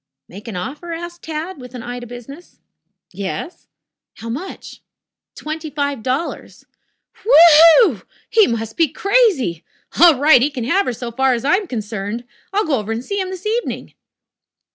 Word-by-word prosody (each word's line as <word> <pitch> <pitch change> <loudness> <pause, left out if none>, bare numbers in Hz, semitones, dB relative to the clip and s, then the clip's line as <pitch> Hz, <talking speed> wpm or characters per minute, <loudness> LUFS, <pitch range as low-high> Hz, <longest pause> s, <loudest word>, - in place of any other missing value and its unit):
"Make 200 +6 -12
an 220 - -6
offer?" 295 - -6
asked 345 +1 -7
Tad, 320 +2 -6
with 250 0 -11
an 240 - -7
eye 245 0 -6
to 240 - -9
business. 245 +8 -12 0.5
"Yes." 195 - -6 0.5
"How 230 - -8
much?" 295 +12 -7 0.5
"Twenty 310 +1 -6
five 285 -3 -2
dollars." 260 +8 -4 0.6
"W 440 - -6
h 325 -2 +9
e 330 +7 +8
w! 265 - 0 0.3
He 440 -2 +4
must 225 -1 -4
be 330 - +4
crazy. 380 - +1 0.4
All 335 -5 +8
right, 285 -3 +6
he 280 - +2
can 265 -5 -5
have 380 +11 +1
her 250 - -1
so 235 +1 -6
far 265 +2 +2
as 235 - -5
I 290 - +3
am 405 -2 -5
concerned. 215 -2 -5 0.3
I'll 410 +2 0
go 280 -6 0
over 220 +1 -4
to 230 - -4
see 400 +7 -3
him 375 - -4
this 375 +1 -8
evening." 460 +3 -3
280 Hz, 180 wpm, -19 LUFS, 235-345 Hz, 0.6 s, h